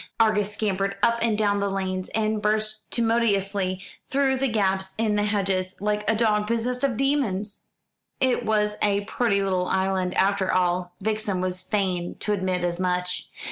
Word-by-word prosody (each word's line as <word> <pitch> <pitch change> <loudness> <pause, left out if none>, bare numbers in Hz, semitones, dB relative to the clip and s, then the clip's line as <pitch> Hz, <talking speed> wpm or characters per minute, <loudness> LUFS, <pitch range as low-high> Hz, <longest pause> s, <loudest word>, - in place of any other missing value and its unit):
Argus 210 -2 +3
scampered 200 -2 -1
up 235 0 +4
and 225 -2 +2
down 205 -1 +2
the 200 0 0
lanes, 185 -1 -2
and 215 -1 0
burst 215 0 -1
tumultuously 200 -5 +1 0.3
through 270 -1 +2
gaps 195 -7 0
in 220 -1 +1
the 205 0 +1
hedges, 190 -3 0
like 210 +1 -1
a 220 - +3
dog 210 -2 +2
possessed 240 +3 -1
of 260 -5 +1
demons. 235 -8 -1 0.5
It 260 -2 +2
was 210 -1 +1
a 200 -1 +2
pretty 200 -3 +1
little 185 -2 0
island, 190 -1 0
after 195 -1 +2
all; 180 -1 0
Vixen 215 -2 -1
was 185 0 -2
fain 185 -3 -1
to 210 - 0
admit 185 -2 -1
as 175 0 -1
much. 180 0 -1
205 Hz, 160 wpm, -25 LUFS, 185-220 Hz, 0.5 s, up